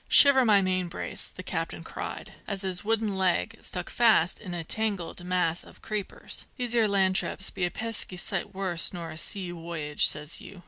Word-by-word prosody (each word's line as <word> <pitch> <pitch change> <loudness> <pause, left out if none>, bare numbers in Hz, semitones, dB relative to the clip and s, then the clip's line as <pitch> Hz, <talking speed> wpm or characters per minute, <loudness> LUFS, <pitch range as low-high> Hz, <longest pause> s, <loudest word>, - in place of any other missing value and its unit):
"Shiver 280 -2 +8
my 205 -4 +4
main 185 -1 0
brace!" 170 - -6
the - - -10
captain - - -4
cried, - - -7
as 200 -1 -3
his 185 -1 -3
wooden 220 -1 0
leg 190 +4 0
stuck 180 - -5
fast 220 -7 +3
in 180 -4 -6
a 170 - -4
tangled 195 -2 -1
mass 180 -2 0
of - - -17
creepers. 210 -3 -4
"These 245 -2 -2
'ere 230 -2 +4
land 190 -2 +2
trips 195 - +1
be 180 - -1
a - - -1
pesky 220 -3 +3
sight - - -2
worse 185 -3 +1
nor 170 -3 -6
a 155 - -9
sea 185 -2 0
woyage, 165 -3 0
says 150 +1 -2
you! 195 - -11
190 Hz, 190 wpm, -27 LUFS, 175-215 Hz, -, Shiver